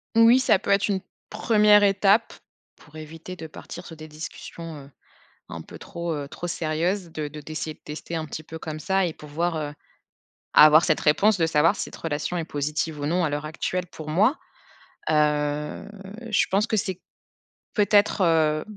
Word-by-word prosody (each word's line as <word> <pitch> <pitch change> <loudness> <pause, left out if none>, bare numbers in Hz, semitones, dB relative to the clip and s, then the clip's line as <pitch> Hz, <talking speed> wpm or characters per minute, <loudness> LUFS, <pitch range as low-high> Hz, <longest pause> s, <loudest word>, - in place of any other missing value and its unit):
Oui, 230 +3 +7
ça 220 -6 +3
peut 200 - -2
être 200 0 +3
une 195 -2 -1 0.3
1re 210 -1 +4
étape, 200 +2 +3 0.4
pour 150 - -19
éviter 160 +3 -9
de 165 -3 -8
partir 175 +3 -10
sur 165 - -10
des 155 0 -9
discussions, 155 0 -8
heu, 140 - -18 0.6
un - - -7
peu - - -12
trop, 170 -1 -5
heu, 145 -1 -5
trop 175 - -6
sérieuses, 170 +3 -1
de 155 -2 -4
de 150 +1 -9
d'essayer 155 +1 -5
de - - -26
tester 155 +2 -7
un 160 -1 -2
petit 155 +1 -7
peu 160 +1 -8
comme 155 -1 -6
ça 190 +3 +1
et 170 - -2
pouvoir, 160 +3 -3
heu, 150 -1 -4 0.8
avoir 155 +2 +8
cette 155 - +1
réponse 200 +8 +3
de 165 - +2
savoir 160 0 +3
si - - -3
cette - - -9
relation 160 +2 -3
est 165 - -2
positive 150 0 -3
ou - - -2
non 175 +3 +1
à - - 0
l'heure 145 +1 -3
actuelle 175 +3 -3
pour 155 -2 -9
moi. 210 - +3 0.7
Heu, 150 -1 0 0.4
je 210 - +3
pense 200 +4 +2
que 220 - 0
c'est 190 -2 -2 0.7
peut-être, 205 -1 +3
heu, 155 -2 +2
165 Hz, 185 wpm, -25 LUFS, 150-190 Hz, 0.8 s, avoir